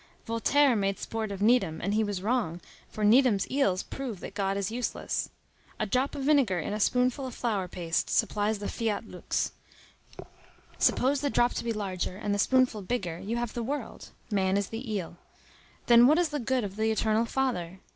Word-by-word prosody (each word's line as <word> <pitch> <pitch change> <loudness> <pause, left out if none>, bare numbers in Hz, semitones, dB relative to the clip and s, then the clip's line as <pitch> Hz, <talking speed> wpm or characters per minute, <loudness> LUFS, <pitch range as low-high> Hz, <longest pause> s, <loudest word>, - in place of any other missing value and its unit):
Voltaire 250 +4 +3
made 195 -2 0
sport 220 -2 -4
of 200 0 -3
Needham, 210 -9 +3
and 200 +3 -1
he 220 +1 +2
was 205 -3 -3
wrong, 210 -7 0 0.3
for 215 - -5
Needham's 220 -2 +5
eels 205 -9 +1
prove 250 -8 -6
that - - -7
God 195 -1 -1
is 200 +1 -2
useless. 245 +1 -2 0.5
A 215 - +1
drop 255 +7 0
of 280 - -4
vinegar 270 -10 +3
in 170 +4 -3
a 210 - -2
spoonful 250 +4 +1
of 250 - -8
flour 210 -6 -1
paste 170 -2 -2
supplies 210 +1 +1
the 205 - -5
fiat 225 -3 -2
lux. - - -2 1.3
Suppose 270 +2 +2
the 285 - 0
drop 240 -2 +2
to - - -3
be 235 - -1
larger 190 -4 -3
and 205 -1 -2
the 205 - -1
spoonful 255 -2 +3
bigger; 185 -5 -3
you 225 +4 -3
have 240 -2 -3
the 240 - -3
world. 260 0 -5 0.2
Man 190 -1 +2
is 200 -1 -1
the 225 +1 -6
eel. 180 -4 -4 0.7
Then 240 0 +7
what 305 +3 +5
is 350 -2 +2
the 295 0 -3
good 255 0 0
of 200 0 -6
the 220 0 +1
Eternal 220 +1 +1
Father? 225 -9 -2
220 Hz, 195 wpm, -28 LUFS, 195-250 Hz, 1.3 s, Then